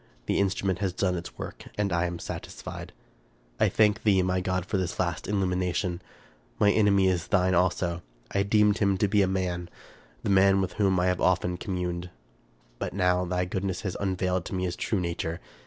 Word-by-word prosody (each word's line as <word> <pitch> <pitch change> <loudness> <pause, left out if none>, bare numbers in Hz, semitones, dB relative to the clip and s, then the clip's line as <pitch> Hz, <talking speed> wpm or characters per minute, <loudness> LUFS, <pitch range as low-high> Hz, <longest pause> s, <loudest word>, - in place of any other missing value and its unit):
The - - +1
instrument 95 -2 0
has 95 -3 -1
done 95 0 0
its 85 0 -7
work, - - -7
and 100 -3 0
I 85 +1 +1
am 85 0 -4
satisfied. - - -7 0.4
" - - -35
I - - +4
thank 105 0 +3
thee, 95 -3 +3
my 90 0 0
God, 90 -1 -1
for 100 - -1
this 90 -2 -3
last 85 -3 -1
illumination! 90 -2 -1 0.6
My 105 -1 +4
enemy 100 -2 +4
is 90 -3 0
thine 95 -2 +2
also. 90 -1 +1 0.3
I 100 - +1
deemed 105 +1 +3
him 100 -2 +2
to 105 - +2
be 100 +1 +3
a 95 - +3
man, 90 -2 -2 0.3
— - - -28
the - - 0
man 95 0 +5
with 90 -2 -1
whom 95 -2 +3
I 90 - +2
have 90 -1 +1
often 90 -1 +2
communed; 90 -2 -3 0.7
but - - -3
now 90 -1 +2
thy 90 +1 -1
goodness 95 0 -3
has 95 -3 -3
unveiled 90 -2 0
to - - -4
me 90 - -1
his 90 -1 -2
true 105 - -1
nature. 85 -1 -3
90 Hz, 200 wpm, -27 LUFS, 90-100 Hz, 0.7 s, man